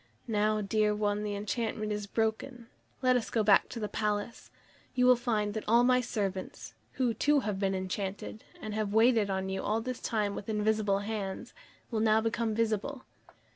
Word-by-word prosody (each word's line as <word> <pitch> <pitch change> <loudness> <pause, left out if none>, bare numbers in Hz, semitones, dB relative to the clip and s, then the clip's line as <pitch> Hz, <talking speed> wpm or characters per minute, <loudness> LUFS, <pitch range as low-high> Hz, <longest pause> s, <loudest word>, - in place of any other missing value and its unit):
Now, 215 -1 +1
dear 210 +1 +1
one, 210 0 0
the 210 -1 -3
enchantment 215 +1 -2
is 210 -1 -3
broken; 225 +3 -2 0.4
let 255 0 +4
us 245 - 0
go 225 - +1
back 205 -1 +5
to 235 - -6
my 215 - -2
palace. 210 +1 -3 0.5
You 250 0 +3
will 250 0 +7
find 220 -4 -1
that 220 - -4
all 235 +2 +5
my 250 0 +4
servants 200 -5 -4 0.2
who, 250 -3 +1
too, 290 +4 +2
have 210 -5 -3
been 195 -1 0
enchanted, 190 +3 -4 0.2
and 215 -1 -5
have 215 -1 -2
waited 225 -2 +4
on 190 0 -1
you 190 0 -2
all 215 +2 0
this 250 +2 -4
long - - -4
time 210 -3 0
with 205 - -7
invisible 210 -2 +1
hands 205 -3 -4 0.4
will 225 - 0
now 220 0 +4
become 225 0 -1
visible." 230 +4 -1
215 Hz, 185 wpm, -30 LUFS, 205-230 Hz, 0.5 s, will